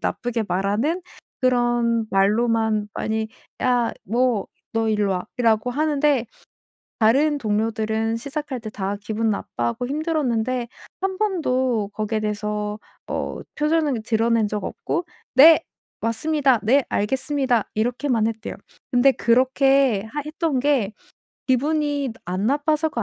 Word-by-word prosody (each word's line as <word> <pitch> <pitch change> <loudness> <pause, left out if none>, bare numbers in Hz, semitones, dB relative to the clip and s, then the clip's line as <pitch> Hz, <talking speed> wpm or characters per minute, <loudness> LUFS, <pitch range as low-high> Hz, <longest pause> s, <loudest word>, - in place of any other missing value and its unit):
나쁘게 240 -2 -2
말하는 210 - 0 0.4
그런 240 -2 +2
말로만 215 +1 +2
많이 220 0 -2 0.3
"야 245 -2 +2
뭐 235 0 +1 0.3
너 225 -1 0
일루 210 -1 +1
와."라고 220 +4 0
하는데 290 -2 +1 0.7
다른 280 +7 +4
동료들은 220 0 -1
시작할 280 +1 -4
때 220 -1 -7
다 200 -1 -3
기분 220 +2 -1
나빠하고 120 - -2
힘들었는데 255 -6 -1 0.3
1 380 0 -2
번도 260 - 0
거기에 215 +1 -1
대해서 210 0 -2 0.3
어 - - -3 0.2
표정을 300 -5 +1
드러낸 225 0 +2
적 210 -1 -3
없고 340 - -3 0.3
"네 315 +5 +8 0.4
왔습니다. 265 +2 +2
네 265 +5 +3
알겠습니다." 260 +1 0
이렇게만 240 +1 0
했대요. 220 -1 -5 0.4
근데 250 +2 +5
그렇게 260 -2 +3
하 295 - -2
했던 305 -3 -1
게 260 -7 +1 0.6
기분이 285 0 +1
안 185 +4 -2
나빠서가 295 0 +1
240 Hz, 260 characters per minute, -22 LUFS, 220-280 Hz, 0.7 s, 네